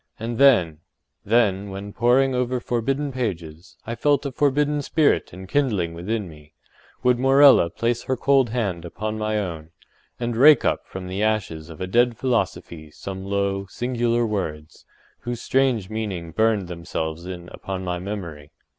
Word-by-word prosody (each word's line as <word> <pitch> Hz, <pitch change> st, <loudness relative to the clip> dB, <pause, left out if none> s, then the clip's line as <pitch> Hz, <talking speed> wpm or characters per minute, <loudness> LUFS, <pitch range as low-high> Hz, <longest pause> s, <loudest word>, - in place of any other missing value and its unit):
And 115 Hz, +1 st, -4 dB
then—then, 100 Hz, -, +1 dB
when, 100 Hz, +1 st, -7 dB
poring 130 Hz, +3 st, +3 dB
over 125 Hz, 0 st, 0 dB
forbidden 135 Hz, +5 st, -1 dB
pages, 90 Hz, -9 st, -5 dB
I 115 Hz, -, -4 dB
felt 145 Hz, +3 st, +1 dB
a 140 Hz, -, -2 dB
forbidden 145 Hz, +2 st, +1 dB
spirit 150 Hz, +1 st, +1 dB
enkindling 95 Hz, -2 st, -1 dB
within 100 Hz, +5 st, -3 dB
me—would 80 Hz, +10 st, -4 dB
Morella 135 Hz, -7 st, +6 dB
place 115 Hz, +5 st, -1 dB
her 130 Hz, -, -1 dB
cold 135 Hz, -1 st, +3 dB
hand 100 Hz, -8 st, -2 dB
upon 110 Hz, +5 st, -5 dB
my 110 Hz, 0 st, -1 dB
own, 85 Hz, -6 st, -4 dB, 0.5 s
and 120 Hz, -1 st, -2 dB
rake 140 Hz, +3 st, +6 dB
up -, -, 0 dB
from 95 Hz, 0 st, -7 dB
the 95 Hz, +2 st, -4 dB
ashes 95 Hz, -7 st, -1 dB
of 80 Hz, -, -11 dB
a -, -, -1 dB
dead 120 Hz, +4 st, +2 dB
philosophy 115 Hz, -10 st, -2 dB
some 95 Hz, +5 st, -7 dB
low, 100 Hz, 0 st, -1 dB
singular 120 Hz, +1 st, 0 dB
words, 80 Hz, -8 st, -5 dB, 0.3 s
whose 120 Hz, -1 st, -5 dB
strange 130 Hz, -6 st, +1 dB
meaning 100 Hz, -6 st, -4 dB
burned 110 Hz, 0 st, +1 dB
themselves 85 Hz, -1 st, -5 dB
in 90 Hz, -2 st, -7 dB
upon 95 Hz, -1 st, -6 dB
my 90 Hz, -1 st, -3 dB
memory. 85 Hz, -7 st, -6 dB
110 Hz, 145 wpm, -23 LUFS, 90-125 Hz, 0.5 s, Morella